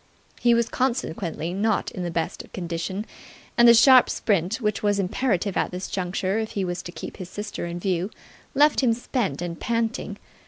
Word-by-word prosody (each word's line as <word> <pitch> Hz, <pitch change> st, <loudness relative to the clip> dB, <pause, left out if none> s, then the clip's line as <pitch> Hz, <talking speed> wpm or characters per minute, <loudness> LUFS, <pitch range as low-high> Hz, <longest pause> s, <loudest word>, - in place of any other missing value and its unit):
He 240 Hz, -1 st, +4 dB
was 235 Hz, -1 st, +2 dB
consequently 175 Hz, -, -2 dB
not 210 Hz, +2 st, 0 dB
in 185 Hz, -, -6 dB
the 175 Hz, -, -2 dB
best 165 Hz, -1 st, -3 dB
of -, -, -18 dB
condition, 175 Hz, +3 st, -3 dB, 0.5 s
and 240 Hz, 0 st, +6 dB
the 235 Hz, -, +10 dB
sharp 255 Hz, +2 st, +7 dB
sprint 195 Hz, -2 st, 0 dB
which 210 Hz, -4 st, -1 dB
was 205 Hz, -1 st, +2 dB
imperative 195 Hz, 0 st, 0 dB
at -, -, +1 dB
this 180 Hz, +1 st, -5 dB
juncture 185 Hz, +2 st, -1 dB
if 220 Hz, -1 st, -4 dB
he 195 Hz, -2 st, -1 dB
was 175 Hz, 0 st, -3 dB
to 175 Hz, -, -8 dB
keep -, -, -8 dB
his 180 Hz, -2 st, -7 dB
sister 205 Hz, -3 st, -5 dB
in 170 Hz, 0 st, -5 dB
view 185 Hz, 0 st, -1 dB, 0.5 s
left 295 Hz, +1 st, +5 dB
him 245 Hz, -3 st, +3 dB
spent 225 Hz, -, -2 dB
and 170 Hz, -1 st, -5 dB
panting. 230 Hz, 0 st, -2 dB
200 Hz, 190 wpm, -24 LUFS, 175-230 Hz, 0.5 s, the